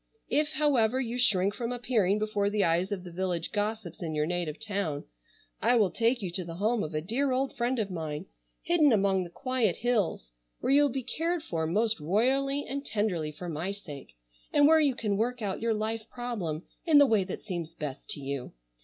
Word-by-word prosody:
If, 300 +1 +2
however, 260 -6 +2
you 245 -1 -2
shrink 200 -5 +3
from 235 +1 -3
appearing 220 -5 +1
before 210 -1 0
the 205 -1 +1
eyes 175 +4 +2
of 190 -3 -3
the 175 - -9
village 175 -1 -2
gossips 210 -4 -3
in 160 -3 -3
your 150 0 +1
native 170 -2 -2
town, 200 -9 -2 0.6
I 245 - +4
will 210 -6 +4
take 235 0 +1
you 180 - -2
to 185 +1 -3
the 165 -1 -7
home 215 +5 +1
of 155 -3 -4
a 155 - 0
dear 250 - 0
old 260 +1 0
friend 245 +2 0
of 210 -4 -1
mine, 160 -1 -4 0.4
hidden 320 -5 +4
among 195 -3 +3
the 175 - -8
quiet 255 -1 0
hills, 210 - 0 0.3
where - - 0
you 285 - +7
will 290 - +4
be 265 +1 -3
cared 330 +6 -1
for 160 - -2
most 215 +5 +1
royally 265 - +1
and 280 +1 -3
tenderly 190 - -1
for 175 +4 -8
my 165 +4 -2
sake, 145 - -10 0.3
and 290 0 +6
where 320 +1 +6
you 285 -5 +3
can 210 -4 -1
work 245 +3 0
out 195 0 -2
your 230 -1 +1
life 220 +1 -3
problem 205 -11 -4 0.2
in 320 -4 +5
the 285 - +9
way 220 -6 +3
that 185 - -6
seems 170 -5 -5
best 145 -4 -6
to - - -4
you. 135 -2 -4
210 Hz, 210 wpm, -29 LUFS, 175-245 Hz, 0.6 s, the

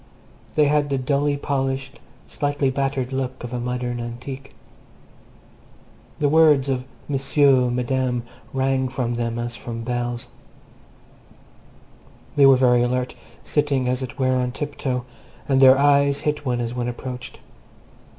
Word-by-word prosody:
They 150 - +5
had 145 0 +2
the 140 - 0
dully 140 +2 0
polished, 135 -1 -2 0.3
slightly 145 -2 -1
battered 135 -1 -2
look 130 -1 -3
of 120 0 -6
a 125 - -2
modern 125 0 -3
antique. 130 +3 -7 1.6
The 145 - +1
words 150 -3 +4 0.4
"M'sieu, 135 -2 +3
Madame" 125 0 -1 0.3
rang 130 -1 0
from 125 -2 -2
them 115 -1 -2
as 120 0 -3
from 115 +1 -6
bells. 120 0 -3 2.1
They 140 -1 +7
were 135 - +8
very 125 -2 +4
alert, 125 +1 0 0.3
sitting, 145 -4 0
as 125 +1 0
it 130 0 -6
were, 130 -1 +2
on 125 -1 -1
tiptoe, 130 -3 -3 0.4
and 135 -1 +3
their 130 0 +8
eyes 140 0 +3
hit 150 -1 -2
one 120 -1 0
as 120 0 -3
one 125 -1 -2
approached. 125 +1 -6
130 Hz, 130 wpm, -22 LUFS, 125-140 Hz, 2.1 s, were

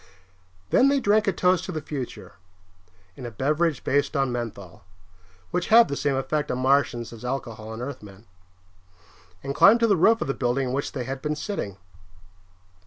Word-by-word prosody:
Then 265 - +5
they 280 0 +2
drank 210 -2 +2
a - - +4
toast 180 0 +2
to - - -5
the 160 - -3
future 140 - -7 0.8
in - - -10
a 120 - -4
beverage 150 - 0
based 145 +2 0
on 135 -2 +1
menthol, 110 -8 -6 0.7
which 180 - -1
had 230 +1 +6
the 140 - -2
same 140 -1 0
effect 145 +3 -2
on 125 - -1
Martians 130 -3 +1
as 115 0 -12
alcohol 115 -4 -5
on 110 +2 -6
Earthmen 105 -6 -9 1.2
and 140 - -3
climbed 225 +10 +6
to - - +5
the 210 -3 +3
roof 225 +6 +4
of - - -2
the 135 - 0
building 125 +1 -1
in - - -3
which 140 +2 -3
they 130 - -3
had 135 +2 -5
been 150 +1 -2
sitting. 150 - -5
135 Hz, 180 wpm, -25 LUFS, 120-165 Hz, 1.2 s, had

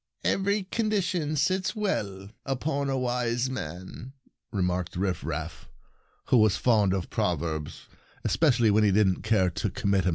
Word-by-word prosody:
"'Every 200 +1 +1
condition 185 -7 -1
sits 185 +8 0
well 105 - -2
Safe 100 - -11 0.2
Play 135 - -1
upon 140 +1 -2
a 135 - 0
wise 125 0 0
man,' 95 - -7 0.2
" - - -57
remarked 90 -3 -1
Rifraf, 80 -4 -3 0.6
who 125 - +5
was 110 -3 +4
fond 105 -6 +3
of 90 -5 -4
proverbs, 80 -3 -2 0.4
especially 120 -8 +3
when 105 +1 +4
he 105 - +4
didn't 95 -2 +3
care 100 -4 +2
to - - -2
commit 100 -2 0
himself. - - +3
110 Hz, 155 wpm, -27 LUFS, 95-140 Hz, 0.6 s, who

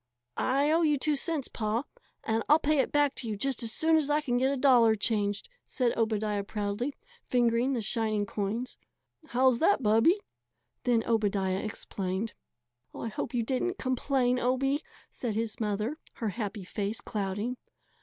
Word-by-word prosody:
"I 280 +3 +2
owe 330 +2 +4
you 300 -3 +3
two 300 +2 +1
cents, 295 -1 -2
Pa, 220 +2 -1 0.4
and 225 0 0
I'll 300 - +8
pay 305 -1 +1
it - - +1
back 290 -1 +3
to 240 - -4
you 215 -2 -3
just 270 +3 -1
as 230 -1 -2
soon 320 +5 +3
as 300 -2 0
I 295 +1 +3
can 250 -5 0
get 265 +1 +2
a 280 - -1
dollar 245 -5 +5
changed," 205 -1 0 0.2
said 245 -3 0
Obadiah 215 -2 0
proudly, 210 +6 -3 0.3
fingering 240 +1 +2
the 235 -4 -1
shining 215 -1 0
coins. 215 +5 -3 0.5
"How's 255 -2 +3
that, 335 -5 +3
Bubby?" 225 - +4 0.7
Then 235 -2 +3
Obadiah 200 -4 +1
explained. 200 0 -4 0.6
"I 230 - -4
hope 230 +3 -4
you 235 - +1
didn't 270 - -1
complain, 255 -1 +1
Obie," 270 +4 +1 0.3
said 230 -4 -3
his 225 +1 -2
mother, 215 +7 -1
her 225 - -2
happy 205 -1 -4
face 205 +4 -3
clouding. 205 +4 -3
235 Hz, 165 wpm, -29 LUFS, 215-270 Hz, 0.7 s, I'll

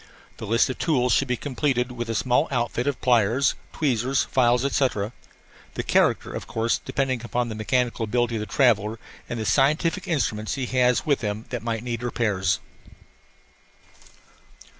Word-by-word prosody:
The 110 - -7
list 115 +3 +3
of 130 - -5
tools 125 -7 +2
should 135 - +2
be 125 -1 -1
completed 130 -2 -1
with 120 -1 -5
a 115 - -1
small 125 +7 +2
outfit 120 0 -1
of 145 - -1
pliers, 120 +2 +3 0.2
tweezers, 130 -2 +1
files, 125 0 +2
etc. 125 -6 0 0.6
the - - -2
character, - - +2
of - - -6
course, 115 +1 0
depending 130 -3 -2
upon 120 0 -1
the - - -4
mechanical 115 +2 0
ability 120 +1 0
of - - -3
the 105 - -4
traveller 110 -2 +2 0.3
and 120 - -3
the 110 - -3
scientific 155 - +2
instruments 110 - -1
he 135 -2 -2
has 125 -1 +2
with 145 -3 +1
him 105 0 -3
that 120 -3 -3
might 115 -1 -3
need 120 -2 -3
repairs. 105 -6 0
120 Hz, 160 wpm, -24 LUFS, 115-130 Hz, 0.6 s, list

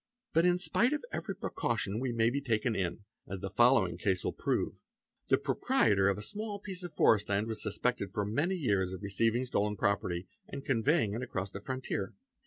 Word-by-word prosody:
But 165 +2 +4
in 180 0 +4
spite 235 +8 +2
of 300 - -3
every - - -3
precaution 110 -3 -2
we 130 0 -1
may 115 0 +2
be 140 +2 -1
taken 120 -2 0
in, 95 +2 -2 0.2
as 95 - -4
the 95 +1 -5
foll 120 -3 +5
agp - - -7
case 95 -2 0
will - - -1
prove: - - -1 0.5
the - - +4
proprietor 100 -3 +2
of 100 - 0
a 105 - -5
small 210 - -4
piece 190 -2 -7
of 175 - -5
forest 105 -8 +3
land 100 +1 +1
was 110 -1 -4
sus 105 - -2
pected 120 -6 0
for 105 +1 -1
many 145 - 0
years 100 - 0
of 95 - -7
receiving 115 +5 +1
stolen 105 -4 0
property 95 -3 0 0.2
and 140 0 -7
conveying 130 -2 +2
it 115 - -3
across 100 -6 -4
the 100 - -7
frontier. 130 -5 -3
110 Hz, 205 wpm, -32 LUFS, 100-135 Hz, 0.5 s, foll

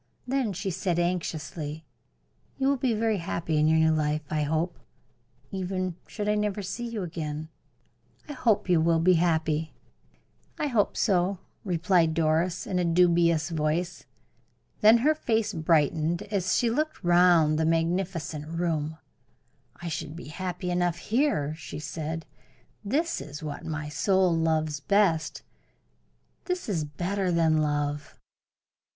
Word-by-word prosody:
Then 255 -3 0
she 195 +1 -3
said, 180 -1 -1
anxiously: 160 -3 -3 0.7
"You 270 0 +2
will 280 - +3
be 245 -3 +1
very 220 -2 +1
happy 165 -2 -1
in 155 - +4
your 160 0 +4
new 160 0 +4
life, 150 0 0
I 155 -1 +1
hope 160 +4 -1 0.7
even 185 -2 -2
should 210 -1 -4
I 210 - +3
never 210 -1 -1
see 235 +6 -4
you 225 -4 -4
again 155 -2 -5 0.8
I 295 - -6
hope 230 -8 +1
you 175 -3 +4
will 165 0 +3
be 185 +3 +5
happy." 160 -2 0 0.8
"I - - -1
hope 235 -8 +1
so," 190 -2 +2 0.3
replied 175 -3 +2
Doris, 165 +2 +1
in 180 - -1
a - - +2
dubious 170 -1 +3
voice. 165 +3 -1 0.7
Then 220 +2 +7
her 310 - +5
face 225 -8 0
brightened 160 0 +1
as 190 -3 +1
she 235 -2 +2
looked 305 +6 -2
round 175 -3 +5
the - - +2
magnificent 165 -2 -1
room. 160 -2 -2 0.9
"I - - -3
should 155 -1 -4
be 170 - -9
happy 180 +2 -4
enough 175 -1 +1
here," 215 - 0
she 155 -2 -8
said. 160 +1 -5 0.6
"This 305 +11 0
is 150 +2 -8
what 145 -2 -6
my 155 -1 -3
soul 185 +3 +2
loves 155 -2 0
best 175 -1 +1 1.0
this 360 -1 -3
is 170 -8 -1
better 180 +5 -2
than 165 -2 +3
love." 145 -1 -1
170 Hz, 140 wpm, -27 LUFS, 155-195 Hz, 1.0 s, Then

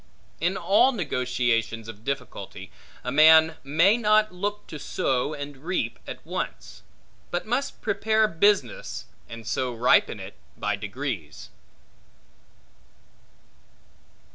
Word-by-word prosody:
In 175 +4 0
all 210 +7 +4
negotiations 120 - -1
of 110 -1 -10
difficulty, 140 +3 -5 0.3
a 125 - -3
man 160 +2 +6
may 165 - +4
not 215 -3 +3
look 205 +3 -3
to 155 - -8
sow 135 +2 -1
and 145 -1 -7
reap 145 -6 -3
at - - -8
once; - - -5 0.5
but 175 - -2
must 250 +5 -2
prepare 220 0 +2
business, 175 - +1 0.2
and 115 0 -9
so 125 +3 -1
ripen 120 +1 +3
it - - -8 0.2
by - - -1
degrees. 105 - -5
150 Hz, 110 wpm, -25 LUFS, 125-200 Hz, 0.5 s, man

